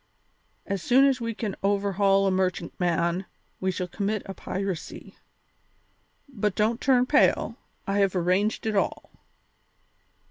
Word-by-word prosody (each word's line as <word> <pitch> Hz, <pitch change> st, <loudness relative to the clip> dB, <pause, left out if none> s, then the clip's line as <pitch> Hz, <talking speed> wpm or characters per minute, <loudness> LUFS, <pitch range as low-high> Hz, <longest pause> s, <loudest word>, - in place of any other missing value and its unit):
As 195 Hz, -2 st, -3 dB
soon 260 Hz, +7 st, +5 dB
as 265 Hz, -3 st, +2 dB
we 230 Hz, -1 st, -3 dB
can 210 Hz, -3 st, -3 dB
overhaul 195 Hz, 0 st, +2 dB
a 195 Hz, -, +2 dB
merchantman 175 Hz, -1 st, -1 dB, 0.3 s
we 190 Hz, -, -1 dB
shall 180 Hz, -1 st, -2 dB
commit 205 Hz, +3 st, -2 dB
a 195 Hz, -, -6 dB
piracy. 190 Hz, -2 st, -5 dB, 1.1 s
But 210 Hz, -7 st, -2 dB
don't 225 Hz, +3 st, +1 dB
turn 255 Hz, -2 st, +4 dB
pale; 255 Hz, -4 st, +2 dB, 0.3 s
I 200 Hz, +1 st, 0 dB
have 195 Hz, -1 st, +2 dB
arranged 185 Hz, +6 st, +1 dB
it 220 Hz, -1 st, -1 dB
all." 195 Hz, -, -1 dB
200 Hz, 130 wpm, -26 LUFS, 185-220 Hz, 1.1 s, soon